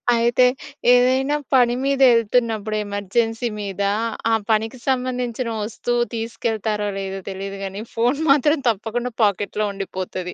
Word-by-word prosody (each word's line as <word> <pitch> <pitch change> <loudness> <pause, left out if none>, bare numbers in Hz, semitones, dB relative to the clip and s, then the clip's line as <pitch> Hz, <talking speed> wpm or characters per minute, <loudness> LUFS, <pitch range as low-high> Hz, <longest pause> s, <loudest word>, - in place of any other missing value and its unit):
అయితే 235 +2 +3 0.5
ఏదైనా 260 +3 +3 0.2
పని 245 -1 +5
మీద 275 0 +1
వెళ్తున్నప్పుడు 225 -2 +1
ఎమర్జెన్సీ 225 +4 -1
మీద 200 -1 -5 0.5
ఆ - - +3 0.2
పనికి 220 +3 0
సంబంధించిన 250 -2 -1
వస్తువు 240 +3 -1
తీసుకెళ్తారో 225 -2 -2
లేదో 195 0 -4
తెలీదు 195 +1 -6
కానీ! 195 +2 -6
ఫోన్ 245 +6 +1
మాత్రం 295 +2 +4
తప్పకుండా 230 +3 -2
పాకెట్‌లో 205 +1 0
ఉండిపోతది. 185 -2 -5
225 Hz, 115 wpm, -21 LUFS, 205-245 Hz, 0.5 s, పని